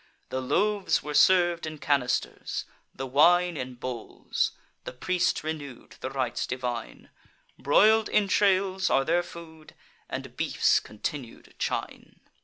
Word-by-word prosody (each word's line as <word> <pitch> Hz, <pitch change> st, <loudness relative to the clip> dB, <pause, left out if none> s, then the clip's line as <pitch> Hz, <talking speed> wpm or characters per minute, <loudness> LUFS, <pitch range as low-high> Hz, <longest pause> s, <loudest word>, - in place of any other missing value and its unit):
The 130 Hz, -, -2 dB
loaves 200 Hz, +8 st, +1 dB
were 150 Hz, -, -5 dB
serv'd 175 Hz, +2 st, +4 dB
in 155 Hz, 0 st, -6 dB
canisters; 135 Hz, -4 st, -1 dB, 0.3 s
the 135 Hz, -, -6 dB
wine 175 Hz, +6 st, +4 dB
In 130 Hz, -3 st, -5 dB
bowls; 120 Hz, -2 st, -3 dB, 0.3 s
the -, -, -7 dB
priest 180 Hz, +8 st, 0 dB
renew'd 145 Hz, -5 st, -7 dB
the 130 Hz, -, -4 dB
rites 130 Hz, -3 st, -2 dB
divine: 125 Hz, -3 st, -5 dB, 0.5 s
Broil'd 215 Hz, +9 st, +4 dB
entrails 195 Hz, -2 st, +2 dB
are 135 Hz, -, +3 dB
their 170 Hz, +3 st, +2 dB
food, 160 Hz, -2 st, -12 dB, 0.3 s
and -, -, -6 dB
beef's -, -, +2 dB
continued 120 Hz, +3 st, -7 dB
chine. -, -, -4 dB
155 Hz, 120 wpm, -27 LUFS, 130-180 Hz, 0.5 s, serv'd